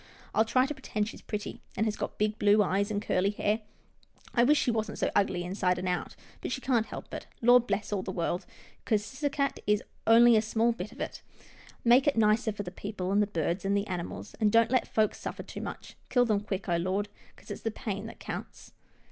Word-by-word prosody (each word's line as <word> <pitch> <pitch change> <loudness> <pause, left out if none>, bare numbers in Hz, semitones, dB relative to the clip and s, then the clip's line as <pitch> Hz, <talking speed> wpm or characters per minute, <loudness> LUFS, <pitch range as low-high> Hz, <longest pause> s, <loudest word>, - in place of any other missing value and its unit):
I'll 220 - +4
try 255 +3 +3
to 295 - -3
pretend 215 -6 -2
she's - - -9
pretty, 210 -1 -5 0.2
and 220 - +2
has 215 -1 0
got - - -4
blue 210 0 +3
eyes 200 +2 0
and 205 -1 -1
curly 185 +2 +2
hair. 210 +1 0 0.7
I 235 - +4
wish 295 +4 +5
she 245 - +2
wasn't 220 -1 -2
so - - 0
ugly 185 -3 +2
inside 180 0 0
and 185 +1 -3
out, 180 -1 -2 0.3
but - - -4
she 260 - -1
can't 240 -4 +1
help - - -8
it - - -6
— - - -34
Lord 245 0 +6
bless 205 +1 -1
all 200 - 0
the 185 - -4
world, 175 0 -2 0.4
'cause 210 -2 +1
Ciscasset 280 +2 -1
is 210 0 +2 0.2
only 235 +1 +8
a 215 - +5
small 225 +2 +2
bit 210 -2 -6
of - - -11
it. - - -4 0.6
Make 245 +4 +5
it 280 - +3
nicer 220 +1 +3
for 205 0 -5
the 180 - -7
people, 190 -1 -4
and 205 +1 +4
the 205 - +2
birds, 170 -1 -1
and 200 +1 +1
the 200 - 0
animals, 180 -3 -5
and 215 -2 +3
don't 230 +1 +4
let 255 - +2
folks 215 -1 +1
suffer - - -5
too - - -8
much. - - -7
Kill 245 -1 +4
them 215 -3 +2
quick, 200 -1 -4
oh 170 -2 +2
Lord, 190 +4 -1 0.3
'cause - - -13
it's - - -6
the 225 - -1
pain 210 -2 -4
that - - -11
counts." - - -7
210 Hz, 230 wpm, -29 LUFS, 195-230 Hz, 0.7 s, only